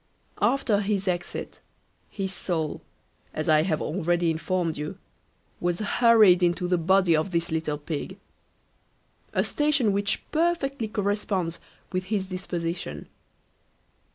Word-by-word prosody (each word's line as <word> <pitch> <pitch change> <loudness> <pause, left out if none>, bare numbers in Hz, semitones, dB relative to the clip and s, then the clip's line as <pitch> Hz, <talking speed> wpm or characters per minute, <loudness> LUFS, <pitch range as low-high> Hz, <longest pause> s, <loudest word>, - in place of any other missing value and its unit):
After 230 -6 +2
his 200 -1 -1
exit, 175 -1 -3 0.5
his 195 -2 -4
soul, 160 -6 -2 0.5
as 155 - -2
I 155 -1 +5
have 160 -2 0
already 175 0 +1
informed 165 0 -1
you, 150 +1 -5 0.6
was 175 0 0
hurried 215 -3 +5
into 175 0 +1
the 180 -1 +2
body 185 0 +4
of 155 +5 0
this 170 -2 -1
little 160 -2 -1
pig; 155 +5 -5 1.1
a - - +1
station 285 -7 +2
which 200 +1 0
perfectly 305 -7 0
corresponds 200 -4 -1 0.3
with 185 -1 -2
his 195 -1 -1
disposition. 170 - -4
185 Hz, 120 wpm, -26 LUFS, 165-205 Hz, 1.1 s, I